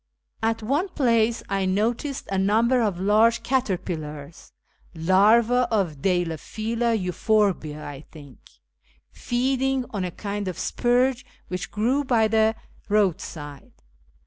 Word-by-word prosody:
At 225 0 -1
one 290 - 0
place 235 -7 +1
I 195 -1 -1
noticed 230 +8 -1
a 195 - 0
number 230 +6 +3
of 200 -6 -1
large 215 +4 +3
caterpillars 170 - -3 0.4
(larvaa 220 +8 +4
of 180 -10 -1
Deilephila 215 +7 -1
Euphorbise, 185 -3 0
I 145 -2 -8
think), 145 -5 -13 0.7
feeding 265 +1 -1
on 200 -3 -3
a 180 - -2
kind 205 +2 -5
of 180 -3 -4
spurge 250 +1 +1 0.3
which 180 0 -4
grew 245 +7 0
by 235 -5 +2
the 220 0 +2 0.3
roadside. 160 -8 -2
215 Hz, 115 wpm, -24 LUFS, 180-235 Hz, 0.7 s, larvaa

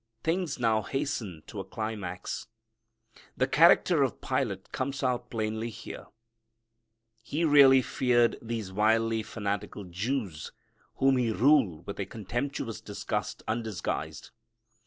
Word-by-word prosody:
Things 165 -2 0
now 110 -3 +2
hasten 130 - -3
to 105 - -8
a - - -3
climax. 100 -3 -5 0.9
The 130 - +3
character 165 +2 +5
of 135 - 0
Pilate 115 -8 -2
comes 140 +2 -3
out 125 -2 0
plainly 110 0 -2
here. 110 - -9 1.1
He 150 +8 -1
really 135 -3 +7
feared 120 -2 +2
these 110 -4 -4
wildly 110 +2 +2
fanatical 105 -1 -4
Jews 95 - -3 0.4
whom 135 0 +3
he 120 -3 +1
ruled 110 - +3
with 100 - -6
a 100 - -2
contemptuous 115 +3 -4
disgust - - -4
undisguised. 110 -4 -3
115 Hz, 115 wpm, -29 LUFS, 105-135 Hz, 1.1 s, really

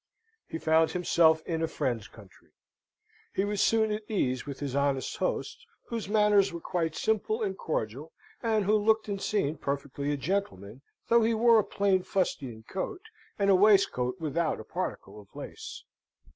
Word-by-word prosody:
He - - -5
found 160 0 +3
himself 165 -3 +3
in 165 -2 -2
a 165 - +1
friend's 120 -7 -2
country. 105 -6 -17 0.9
He 195 - +1
was 205 -1 -1
soon 220 -1 +3
at 210 +1 -2
ease 130 - -1
with 140 -2 -6
his 140 -2 -4
honest 140 -1 0
host, - - -2 0.3
whose 230 -4 -4
manners 210 -2 +4
were 170 - -6
quite 165 -2 -2
simple 220 +1 0
and 195 -2 -2
cordial, 145 - -4 0.3
and 220 -3 +1
who 210 - +2
looked 220 +1 +3
and 200 -2 -3
seemed 155 -8 -1
perfectly 140 0 -3
a 145 - -1
gentleman, 135 - -3 0.3
though 235 0 +6
he 225 +1 +2
wore 230 0 +5
a - - +2
plain 195 -2 +1
fustian 135 - -2
coat, 195 - -5 0.4
and 200 -1 +3
a - - +6
waistcoat 190 -9 +3
without 160 -1 -1
a - - -7
particle 105 - -5
of 100 - -19
lace. - - -8
175 Hz, 170 wpm, -29 LUFS, 140-210 Hz, 0.9 s, though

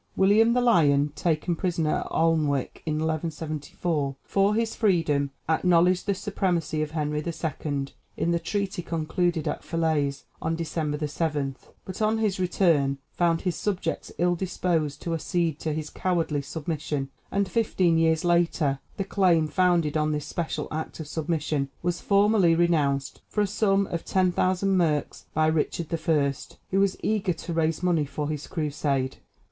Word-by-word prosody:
William 215 +4 +5
the 250 - +2
Lion, 150 -11 +4
taken 170 +1 0
prisoner 165 -3 0
at - - -5
Alnwick 155 -5 +1
in 155 - +1
1174, 155 -2 -2
for 200 +1 +2
his 225 0 0
freedom 165 -9 +2 0.2
acknowledged 175 +3 +3
the 200 - +2
supremacy 180 -6 -1
of 155 - -1
Henry 150 -1 -2
II. 155 -4 -3 0.3
in 170 - +1
the 170 - +1
treaty 200 +2 -2
concluded 165 0 -1
at - - -3
Felaise 155 -4 0 0.2
on 165 - 0
December 155 -2 -2
7; 145 -3 -1 0.3
but 185 +3 -7
on 215 +1 +2
his 210 -4 0
return 165 -7 +2
found 170 -2 +1
his 180 -2 -1
subjects 200 -3 -2
ill 175 +1 +2
disposed 170 -5 -1
to 170 - -2
accede 165 -1 -1
to 155 - -2
his 155 0 -4
cowardly 165 -5 0
submission; 145 -2 -4 0.2
and 200 0 +1
fifteen 185 -4 +2
years 160 +1 +2
later 170 -5 +2 0.2
the 195 - 0
claim 180 -5 +3
founded 170 -2 +2
on 155 0 +1
this 150 -1 -3
special 170 -2 -3
act 160 +1 -5
of 160 - -6
submission 150 -3 -1
was 175 0 -1
formally 200 -4 +4
renounced 145 -5 +1
for 210 - -1
a - - +3
sum 200 -1 +2
of 170 -3 -4
10,000 185 +1 +1
merks 155 -5 0
by 155 0 +3
Richard 160 +1 0
I., 155 -4 +2 0.4
who 195 - +2
was 195 -1 +2
eager 205 -4 +1
to 165 +1 -6
raise 160 +1 0
money 170 -4 +2
for 145 +1 -4
his 150 -1 -4
Crusade. 145 -4 -1
165 Hz, 155 wpm, -26 LUFS, 150-180 Hz, 0.4 s, William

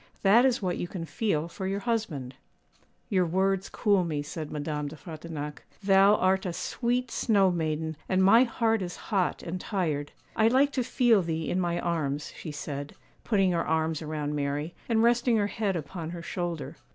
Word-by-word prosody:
That 220 +6 +6
is 250 -5 +1
what 180 -1 -1
you - - -2
can 175 -2 -5
feel 165 -1 -1
for 190 +2 -5
your 195 +1 -2
husband.' 190 - -2 0.7
'Your 185 -3 +2
words 190 +2 +1
cool 200 -4 +2
me,' 150 -4 -2
said 155 +1 -6
Madame 150 0 -3
de 145 - -7
Frontignac. 155 -2 -7 0.2
'Thou 195 +1 +6
art 190 0 +2
a 175 - -3
sweet 245 +7 -1
snow 200 -5 +3
maiden, 160 -1 -2
and 190 0 +3
my 225 +6 +7
heart 225 -3 +1
is 180 -1 -4 0.2
hot 190 -3 +1
and 180 +2 -4
tired. 155 -8 -2 0.2
I 220 - +4
like 270 +4 +4
to 260 -3 0
feel 235 -4 +3
thee 165 -2 -2
in 185 - +1
my 175 -1 0
arms,' 150 -4 -2
she 155 - -7
said, 145 -1 -6 0.3
putting 195 -4 +2
her 170 -1 +1
arms 160 0 0
around 150 -1 -3
Mary, 145 +3 -2 0.2
and 225 -1 +3
resting 240 0 +3
her 205 - +2
head 205 -2 -1
upon 165 +1 -5
her 170 0 -7
shoulder. 175 -3 -4
180 Hz, 185 wpm, -28 LUFS, 155-205 Hz, 0.7 s, my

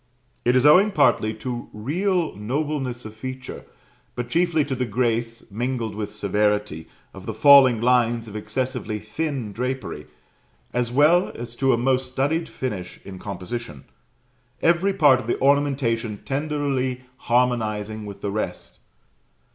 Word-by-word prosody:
It 120 +1 +3
is 130 - +3
owing 180 +8 +7
partly 125 - +3
to 120 -2 -5
real 170 - -1
nobleness 130 +2 -3
of 110 - -8
feature, 130 +3 -7 0.5
but 125 0 -5
chiefly 165 -3 +2
to 140 - -3
the 125 -1 -2
grace, 115 0 -1
mingled 120 +1 -2
with 105 0 -5
severity, 105 -4 -1 0.3
of - - -11
the - - -4
falling 140 -5 +7
lines 120 -1 +2
of 105 - -10
excessively 115 +1 -3
thin 115 +1 -4
drapery; 125 +1 -4 0.7
as 120 -1 -1
well 155 +7 +4
as 120 0 -7
to 135 -1 +3
a 120 - +3
most 130 +1 0
studied 155 +6 0
finish 100 -9 -5
in 95 -2 -9
composition, 95 - -6 0.8
every 170 +4 +3
part 145 -8 +5
of 120 - -8
the - - -1
ornamentation 135 -6 +1
tenderly 135 -3 -1 0.2
harmonizing 110 -4 0
with 100 - -9
the 100 - -2
rest. 105 +1 -5
125 Hz, 140 wpm, -23 LUFS, 110-140 Hz, 0.8 s, owing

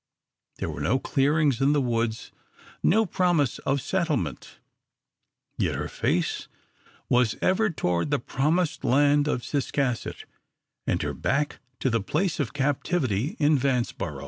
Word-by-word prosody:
There - - -3
were - - -6
no 125 - +2
clearings 140 0 +1
in 140 +2 +4
the 150 - +3
woods, 115 -3 -1 0.5
no 220 +5 +4
promise 175 - +1
of 135 0 0
settlement, 170 -8 -2 1.0
yet - - +1
her - - -3
face - - -1 0.6
was 125 -3 +3
ever 215 +4 +2
toward 90 - -1
the 145 - +2
promised 155 +7 0
land 145 +2 +3
of 125 -5 -1
Ciscasset, 140 -3 -2 0.6
and - - +1
her - - -2
back 145 +1 -1 0.2
to 130 - +1
the 115 -1 +1
place 165 - -1
of 140 -6 -1
captivity 140 - 0
in 150 -1 +4
Vanceboro. 125 -2 -1
140 Hz, 135 wpm, -26 LUFS, 125-155 Hz, 1.0 s, in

